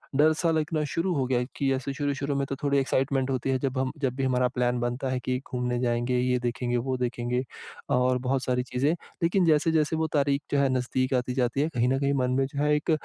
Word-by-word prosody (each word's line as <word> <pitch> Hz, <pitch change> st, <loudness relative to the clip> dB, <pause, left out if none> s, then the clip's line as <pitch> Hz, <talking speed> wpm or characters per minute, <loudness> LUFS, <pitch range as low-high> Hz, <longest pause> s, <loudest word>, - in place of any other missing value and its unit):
डर 155 Hz, +3 st, +5 dB
सा 165 Hz, -1 st, +2 dB
लगना 155 Hz, 0 st, 0 dB
शुरू 175 Hz, +2 st, 0 dB
हो 135 Hz, -2 st, +1 dB
गया 125 Hz, -2 st, +1 dB
है 125 Hz, -, -1 dB
कि 135 Hz, -1 st, 0 dB
ऐसे 135 Hz, +1 st, -3 dB
शुरू-शुरू 140 Hz, 0 st, -2 dB
में 140 Hz, 0 st, 0 dB
तो 135 Hz, -, -2 dB
थोड़ी 140 Hz, 0 st, +2 dB
एक्साइटमेंट 135 Hz, 0 st, 0 dB
होती 130 Hz, +1 st, -1 dB
है 130 Hz, -, +2 dB
जब 130 Hz, -1 st, -2 dB
हम 130 Hz, 0 st, 0 dB
जब 130 Hz, -2 st, 0 dB
भी 135 Hz, -, -2 dB
हमारा 125 Hz, -1 st, +2 dB
प्लान 125 Hz, 0 st, +1 dB
बनता 120 Hz, +2 st, -2 dB
है 130 Hz, -1 st, -1 dB
कि 125 Hz, 0 st, 0 dB
घूमने 125 Hz, -1 st, -1 dB
जाएँगे, 120 Hz, 0 st, 0 dB
ये 125 Hz, 0 st, +2 dB
देखेंगे 120 Hz, 0 st, -1 dB
वो 130 Hz, +2 st, -1 dB
देखेंगे, 125 Hz, 0 st, -1 dB, 0.5 s
और 125 Hz, -1 st, +2 dB
बहुत 130 Hz, +1 st, -1 dB
सारी 125 Hz, 0 st, 0 dB
चीज़ें, 130 Hz, +4 st, 0 dB, 0.3 s
लेकिन 175 Hz, +1 st, +3 dB
जैसे-जैसे 160 Hz, 0 st, +3 dB
वो 160 Hz, 0 st, 0 dB
तारीख 140 Hz, -1 st, +2 dB
जो 140 Hz, -, +2 dB
है 140 Hz, -1 st, +3 dB
नज़दीक 130 Hz, +1 st, 0 dB
आती 125 Hz, 0 st, 0 dB
जाती 125 Hz, +1 st, 0 dB
है 155 Hz, -, +1 dB
कहीं 120 Hz, +1 st, +2 dB
न 135 Hz, +1 st, +1 dB
कहीं 140 Hz, 0 st, +1 dB
मन 125 Hz, -, 0 dB
में 135 Hz, -, +3 dB
जो 140 Hz, +2 st, -3 dB
है 150 Hz, 0 st, +3 dB
एक 150 Hz, +2 st, -1 dB
130 Hz, 245 wpm, -27 LUFS, 125-140 Hz, 0.5 s, डर